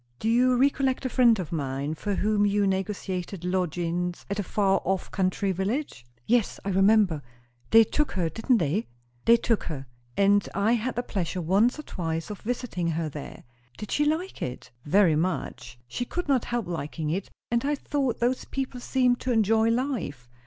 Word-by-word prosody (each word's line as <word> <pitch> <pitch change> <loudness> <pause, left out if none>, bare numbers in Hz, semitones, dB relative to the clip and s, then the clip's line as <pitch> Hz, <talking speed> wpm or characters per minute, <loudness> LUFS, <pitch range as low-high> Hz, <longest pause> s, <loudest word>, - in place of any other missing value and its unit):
Do 220 - -3
you 250 +2 +4
recollect 270 0 +2
a - - +1
friend 240 -3 +5
of 180 -5 -5
mine, 140 -1 -2
for 200 +5 -3
whom 210 +1 +2
you 205 0 +2
negotiated 190 -2 -3
lodgings 175 -1 -1
at 200 - -1
a - - 0
far 195 0 +1
off 190 0 -1
country 190 0 0
village?" 195 - -2 0.2
"Yes, 235 -3 +1
I - - -1
remember. 195 -4 +4 0.5
They 225 0 +8
took 300 +7 -1
her, 180 -3 0
didn't 225 - +1
they?" 170 +5 0 0.4
"They 235 +1 +7
took 230 -1 0
her. 140 -5 -5 0.3
And 200 0 +3
I 200 +3 +2
had 240 +1 0
the 245 - -1
pleasure 185 -5 -3
once 195 - +2
or 305 - -7
twice 165 - -4
of 205 - -8
visiting 230 -7 -2
her 165 -1 -1
there." 145 -1 -9 0.3
"Did 210 - -7
she 295 - +2
like 320 +5 -1
it?" 125 - -5
"Very 175 0 +4
much. 155 -6 -3
She 120 - -3
could 355 +6 -4
not 270 -4 +2
help 240 -3 -2
liking 155 -2 -3
it. 190 +4 -3 0.2
And 235 0 +1
I 290 +1 +1
thought 275 -3 -1
those 245 +2 0
people 265 -2 -4
seemed 250 0 +2
to 255 - -2
enjoy 225 0 +3
life. 230 - -2
205 Hz, 180 wpm, -26 LUFS, 175-245 Hz, 0.5 s, They